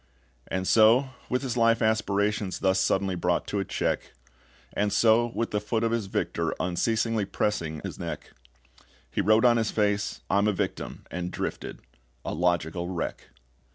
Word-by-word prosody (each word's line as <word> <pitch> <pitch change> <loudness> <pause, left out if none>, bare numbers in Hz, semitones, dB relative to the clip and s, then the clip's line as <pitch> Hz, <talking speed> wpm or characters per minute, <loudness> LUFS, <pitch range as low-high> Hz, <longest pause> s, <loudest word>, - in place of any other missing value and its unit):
And 95 0 -2
so, 115 +5 +5 0.2
with 125 +2 0
his 125 -3 -2
life 115 -1 +4
aspirations 105 -2 0
Thus 95 -1 +2
suddenly 95 0 +1
brought 90 0 0
to 105 - -1
a - - 0
check - - -2 0.6
And 105 0 0
so, 115 +2 +4
with 115 - -1
the 105 - 0
foot 110 +2 -1
of 115 - +1
his 115 -4 -1
victor 85 -3 -1
Unceasingly 110 +4 0
pressing 85 -6 -2
his - - -6
neck - - -6 0.8
He - - 0
wrote 110 +4 +4
on 120 -1 +5
his 110 -2 +1
face, 105 -1 0
"I'm 100 +1 +2
a 105 - +2
victim," - - -4
and 90 +1 -3
drifted - - -5 0.4
a - - -3
logical 85 +1 0
wreck. 90 -3 -4
105 Hz, 160 wpm, -27 LUFS, 95-115 Hz, 0.8 s, so